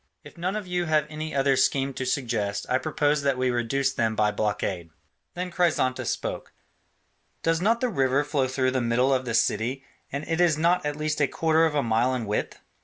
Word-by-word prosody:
If - - -13
none 180 +3 -2
of 215 -2 -4
you 180 -1 -1
have 155 -2 +2
any 155 0 -5
other 135 0 +3
scheme 135 +1 +1
to 130 0 -4
suggest, 115 -6 -1
I 130 - +1
propose 150 0 0
that 140 -2 +1
we 130 0 +1
reduce 130 +3 0
them 110 -1 0
by 105 -1 +2
blockade." 100 -5 -2 0.5
Then 180 +1 -4
Chrysantas 170 -8 +1
spoke: - - -4 0.9
"Does 165 0 +1
not 225 +4 +2
the 255 - +2
river 135 - +1
flow 145 -3 0
through 130 0 0
the 130 -1 0
middle 120 +3 +2
of 130 -1 0
the 115 -2 -2
city, 125 +4 0 0.3
and 140 +2 -4
it 165 +2 0
is 165 -4 +3
not 175 +3 +2
at 145 - -2
least 155 0 -2
a 140 - +4
quarter 160 +2 +2
of 155 - -4
a 145 - +2
mile 120 +3 +1
in 120 -3 -3
width?" 105 0 -3
135 Hz, 210 wpm, -26 LUFS, 125-155 Hz, 0.9 s, a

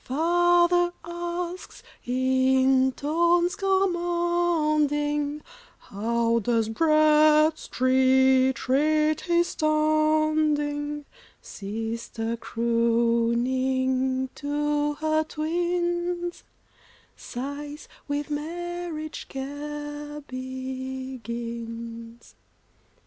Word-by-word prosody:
Father 350 +4 +3
asks, 345 +1 -5 0.2
in 260 +1 +3
tones 340 +5 +2
commanding, 345 -6 0 0.3
"How 230 +3 0
does 225 0 0
Bradstreet 265 -3 +3
rate 305 +3 +2
his 345 0 +1
standing?" 310 -1 +1 0.3
Sister 225 +2 -5
crooning 235 +3 +1
to 295 0 -1
her 310 +1 +1
twins, 345 +2 -2 0.7
Sighs, 290 +4 -7 0.2
"With 290 +1 -3
marriage 335 +1 -5
care 295 +2 -6
begins." 240 -3 -6
295 Hz, 55 wpm, -25 LUFS, 260-315 Hz, 0.7 s, Father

